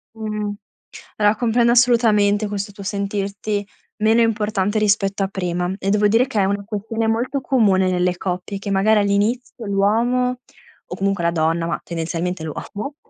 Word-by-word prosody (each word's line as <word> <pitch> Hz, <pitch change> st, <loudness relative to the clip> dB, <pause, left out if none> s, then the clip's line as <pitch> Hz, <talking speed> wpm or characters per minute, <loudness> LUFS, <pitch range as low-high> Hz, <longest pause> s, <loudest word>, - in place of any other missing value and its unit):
Mh. 215 Hz, -1 st, -3 dB, 0.7 s
Allora, 210 Hz, 0 st, +3 dB
comprendo 235 Hz, +1 st, +2 dB
assolutamente 225 Hz, -4 st, +3 dB
questo 205 Hz, 0 st, -4 dB
tuo 200 Hz, 0 st, -10 dB
sentirti 200 Hz, +1 st, -3 dB, 0.3 s
meno 220 Hz, +2 st, +3 dB
importante 210 Hz, -2 st, 0 dB
rispetto 200 Hz, -1 st, +1 dB
a -, -, 0 dB
prima 180 Hz, -1 st, -2 dB
e 195 Hz, -, -2 dB
devo 210 Hz, +1 st, +3 dB
dire 225 Hz, +5 st, +3 dB
che 225 Hz, -5 st, -1 dB
è 195 Hz, -, +3 dB
una 200 Hz, +1 st, -1 dB
questione 225 Hz, +2 st, -3 dB
molto 240 Hz, +5 st, -1 dB
comune 200 Hz, -9 st, +2 dB
nelle 180 Hz, 0 st, +1 dB
coppie, 185 Hz, +2 st, -4 dB
che 200 Hz, 0 st, -5 dB
magari 210 Hz, +3 st, +3 dB
all'inizio 220 Hz, +4 st, -1 dB
l'uomo 235 Hz, +6 st, +1 dB, 0.5 s
o -, -, -3 dB
comunque 195 Hz, -2 st, -1 dB
la 170 Hz, -, +2 dB
donna, 165 Hz, +1 st, 0 dB
ma 170 Hz, -, -2 dB
tendenzialmente 170 Hz, +1 st, -3 dB
l'uomo, 205 Hz, -, -6 dB
205 Hz, 155 wpm, -20 LUFS, 195-225 Hz, 0.7 s, Allora